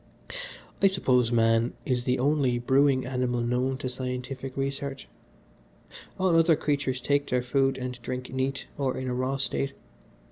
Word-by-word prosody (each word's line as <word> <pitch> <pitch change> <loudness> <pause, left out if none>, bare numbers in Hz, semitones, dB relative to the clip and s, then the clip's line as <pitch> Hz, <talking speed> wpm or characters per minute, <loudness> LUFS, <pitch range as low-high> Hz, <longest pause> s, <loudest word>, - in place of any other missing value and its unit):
"I 195 - +7
suppose 125 -11 +2
man 115 0 +3
is 125 -2 0
the 125 - +2
only 135 -2 +2
brewing 130 +2 +3
animal 125 -2 -1
known 125 +2 0
to 130 - -4
scientific 130 +1 -5
research. 135 0 -3 1.1
All 185 -2 +2
other 165 0 +5
creatures 140 -4 -1
take 140 +2 0
their 125 -1 +1
food 135 +1 +1
and 125 -1 -5
drink 125 +1 -5
neat, 135 +1 -1
or 135 -2 0
in 130 - -3
a 125 - -1
raw 130 +2 -1
state. 135 0 -1
130 Hz, 150 wpm, -27 LUFS, 125-140 Hz, 1.1 s, I